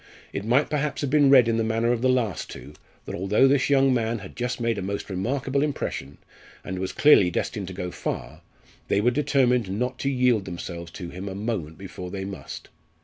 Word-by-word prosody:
It 100 - -3
might 125 +7 +3
perhaps 150 -1 -1
have 140 -3 -2
been 145 -2 +5
read 130 -4 +7
in 115 -1 +1
the 115 - +1
manner 115 +1 +1
of 120 -1 0
the 130 - +3
last 120 -7 0
two, 75 - -10 0.3
that - - -6
although 95 +8 +3
this 135 0 +2
young 135 -1 +4
man 115 -1 0
had 95 -3 -10
just 120 0 -2
made 115 -3 0
a - - -4
most 100 +2 -4
remarkable 130 +8 -1
impression, 75 - -3 0.5
and 95 -1 -5
was 95 0 -2
clearly 145 -11 +6
destined 95 +2 -3
to 95 - -6
go 90 -1 -4
far, 65 0 -5 0.5
they 100 - +2
were 120 +4 +3
determined 125 -5 +2
not 125 +6 -2
to 135 - 0
yield 125 -6 +2
themselves 85 -2 -6
to 90 -3 -7
him 95 +2 -6
a 95 - -6
moment 100 -7 -3
before 90 -1 -8
they 95 +1 -5
must. 100 0 -8
115 Hz, 210 wpm, -25 LUFS, 95-130 Hz, 0.5 s, read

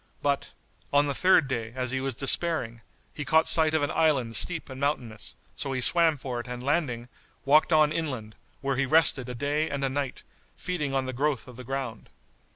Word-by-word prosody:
But, 140 -1 -1 0.4
on 145 +1 +4
the 140 - -1
third 180 -1 +4
day 115 -3 -4
as 130 -1 -1
he 130 0 -1
was 135 -2 -2
despairing 135 -4 +2 0.3
he 150 - -5
caught 160 +3 +3
sight 160 -1 +4
of 155 - +1
an 145 - -1
island 140 -9 +1
steep 165 +7 +1
and 130 0 -9
mountainous; 125 -7 -3 0.2
so 135 - -1
he 130 - -2
swam 165 +2 +3
for 125 -2 -5
it 120 - -7
and 125 0 -6
landing, 135 -5 -1 0.4
walked 150 +4 +4
on 155 -1 +4
inland, 130 -10 -4 0.3
where 135 -2 -1
he 135 0 +1
rested 145 -4 +3
a 125 - -5
day 145 +5 -1
and 140 -1 -2
a - - 0
night, 135 -1 -4 0.3
feeding 150 -7 -3
on 135 -1 0
the 130 - -4
growth 140 0 -1
of 125 - -11
the 125 - -9
ground. 130 -3 -5
135 Hz, 205 wpm, -27 LUFS, 125-155 Hz, 0.4 s, on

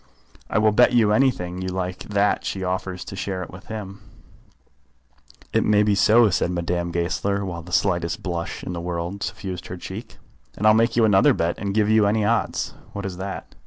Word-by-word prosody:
I - - 0
will 110 0 +4
bet 125 +4 +4
you 110 -4 +4
anything 100 -8 +1
you 95 - -3
like 90 0 -3
that 100 0 +1
she 95 - -3
offers 95 0 -3
to - - -7
share 95 -1 -3
it - - -10
with 90 - -12
him." 100 -2 -7 1.5
"It - - +3
may 105 0 +4
be 105 -1 +2
so," 105 +2 +5
said 90 - +1
Madame 85 0 -2
Goesler, 100 +4 -1
while 85 -3 -5
the 90 +2 -12
slightest 85 -2 0
blush 85 0 -4
in 90 - -4
the 85 - -4
world 85 +3 -4
suffused 90 -3 -5
her 90 - -6
cheek. 100 +6 -8 0.4
"And 105 - -2
I'll 110 - +7
make 115 +1 +2
you 115 -2 +4
another 95 -3 +5
bet, 85 +1 -1
and 100 -1 -3
give 105 -1 +3
you 110 -1 +4
any 105 +1 +1
odds." 115 +1 0 0.2
"What 100 -1 -5
is 95 -2 -5
that?" 95 +1 -6
95 Hz, 200 wpm, -23 LUFS, 90-105 Hz, 1.5 s, I'll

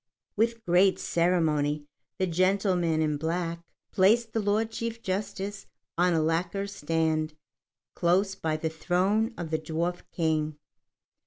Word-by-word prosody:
With 230 +1 0
great 185 +1 +4
ceremony 155 -4 +1 0.3
the 190 - +1
gentleman 180 -2 +2
in 150 -1 0
black 165 +2 -2 0.3
placed 220 +4 +3
the 225 - +1
Lord 215 +2 +1
Chief 230 0 -4
Justice 200 +1 -3 0.3
on 175 0 +3
a 160 - +2
lacquer 175 +5 0
stand 160 -4 -1 0.6
close 185 +3 +2
by 155 -4 -2
the 160 - -2
throne 190 +8 +1
of 165 -2 -5
the 160 - +1
Dwarf 170 +3 -2
King. 155 -2 0
175 Hz, 130 wpm, -28 LUFS, 160-200 Hz, 0.6 s, great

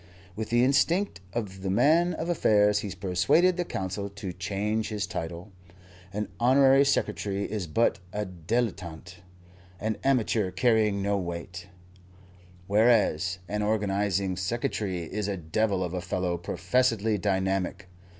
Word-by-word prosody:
With 110 0 -4
the 120 +1 +3
instinct 165 - +2
of 100 -4 -4
the 95 - -3
man 165 - +3
of 160 - -4
affairs 105 -11 +3
he 105 - -4
persuaded 95 - +2
the 175 - -1
Council 100 - -4
to 100 -2 -7
change 105 +4 -2
his 105 -2 -2
title. 85 +4 -6 0.6
An 105 +1 -3
Honorary 135 +2 +5
Secretary 100 -6 0
is 100 -3 -3
but 115 +5 +1
a 105 +1 -2
dilettante, 90 -2 -3 0.6
an 110 +1 -2
amateur 115 -6 +2
carrying 105 0 +2
no 100 0 +1
weight, 90 0 -6 1.0
whereas 100 -5 +3
an 105 0 -2
Organizing 100 -3 0
Secretary 95 -2 -2
is 100 +5 -4
a 100 -1 -2
devil 95 +4 0
of 90 -1 -4
a 90 - -2
fellow 90 0 -1
professedly 105 +5 0
dynamic. 95 0 -1
100 Hz, 130 wpm, -27 LUFS, 90-110 Hz, 1.0 s, Honorary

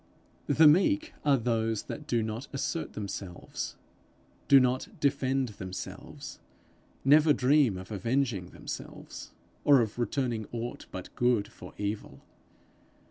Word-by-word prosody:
The 160 - +5
meek 295 - +4
are 145 -2 +4
those 115 -2 0
that 150 - -7
do 120 -5 +1
not 110 +4 -4
assert 140 +4 -3
themselves, 100 -3 -5 0.7
do 140 - +8
not 130 0 +1
defend 135 -2 +1
themselves, 95 -3 -8 0.7
never 150 +2 +6
dream 135 -6 +3
of 95 +3 -9
avenging 115 -2 0
themselves, - - -8 0.3
or 140 -2 +7
of 115 0 -1
returning 120 -2 -1
aught 120 +1 -5
but 95 - -8
good 120 -4 +2
for - - -12
evil. 105 +1 -4
120 Hz, 120 wpm, -29 LUFS, 110-140 Hz, 0.7 s, do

